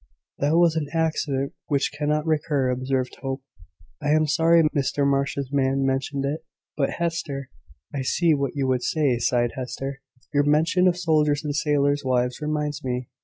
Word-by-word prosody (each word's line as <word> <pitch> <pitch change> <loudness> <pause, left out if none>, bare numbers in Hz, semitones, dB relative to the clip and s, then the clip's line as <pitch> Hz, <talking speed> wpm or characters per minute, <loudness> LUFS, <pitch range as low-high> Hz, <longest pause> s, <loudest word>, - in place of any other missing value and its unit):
"That 150 +4 +2
was 170 -2 +4
an 155 -2 -1
accident 155 -4 0
which 140 -2 +1
cannot 150 +1 0
recur," 150 -4 +1
observed 130 0 -2
Hope. 135 0 -4 0.6
"I 145 - -1
am 155 +1 +4
sorry 165 +2 +4
Mr 140 0 +1
Marsh's 140 -1 0
man 135 -1 +1
mentioned 135 +1 -1
it. 155 +3 -3 0.3
But 140 -2 0
Hester 160 -5 -3 0.2
." 75 - -29
"I 140 - -2
see 165 +5 +2
what 140 -2 -1
you 140 -2 0
would 130 -1 +1
say," 140 -4 +1
sighed 120 0 +1
Hester; 135 +1 -5 0.3
"your 145 - +4
mention 160 +5 +3
of 180 -1 +2
soldiers' 155 -4 +2
and 145 -1 -2
sailors' 145 -1 +2
wives 125 0 0
reminds 150 -1 -2
me. 125 -1 -3
145 Hz, 170 wpm, -24 LUFS, 135-155 Hz, 0.6 s, was